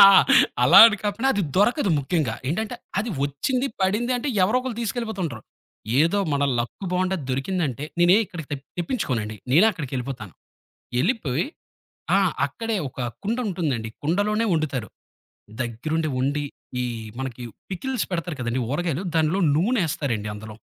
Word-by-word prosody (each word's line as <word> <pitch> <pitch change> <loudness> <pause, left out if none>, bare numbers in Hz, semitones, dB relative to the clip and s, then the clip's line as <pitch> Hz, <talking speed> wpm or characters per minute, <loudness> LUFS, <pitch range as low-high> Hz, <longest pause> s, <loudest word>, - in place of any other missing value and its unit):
ఆ! - - +11 0.6
అలా 175 +9 +8
అని 220 -1 +2
కాకుండా 220 +6 0
అది 200 -4 0
దొరకదు 210 - +3
ముఖ్యంగా. 140 -5 0
ఏంటంటే 210 +7 -2 0.2
అది 220 +2 -1
వచ్చింది 250 - -1
పడింది 215 +7 +1
అంటే, 255 +4 -3 0.2
ఎవరో 215 +7 +2
ఒకళ్ళు 250 -3 -5
తీసుకెళ్ళిపోతుంటారు. 195 - -3 0.6
ఏదో 170 +6 +3
మన 145 0 +1 0.2
లక్కు 120 +11 -4
బావుండి 185 +1 +1
దొరికిందంటే, 145 -1 -1 0.2
నేనే 175 +3 +6
ఇక్కడికి 170 -7 -8
తెప్ 140 0 -5 0.2
తెప్పించుకోనండి. 120 - -2 0.2
నేనే 180 +9 +7
అక్కడికెళ్ళిపోతాను. 130 - -5 0.7
ఎళ్ళిపోయి, 160 - 0 0.7
ఆ! - - +5 0.3
అక్కడే, 225 -2 -3
ఒక 130 - -13 0.3
కుండ 230 +4 0
ఉంటుందండి. 140 -11 -2
కుండలోనే 205 +7 +1
వండుతారు. 135 - -1 0.7
దగ్గరుండి 155 +7 -2
వండి, 145 +3 0 0.4
ఈ - - 0 0.4
మనకి 125 -2 -5 0.3
పికిల్స్ 255 +6 -2
పెడతారు 170 -2 -2
కదండీ, 120 +2 -1
ఊరగాయలు. 170 +2 -1
దానిలొ 160 +4 +2 0.2
నూనెేస్తారండి 155 - 0
అందులో, 110 0 -9
165 Hz, 130 wpm, -24 LUFS, 135-205 Hz, 0.7 s, ఆ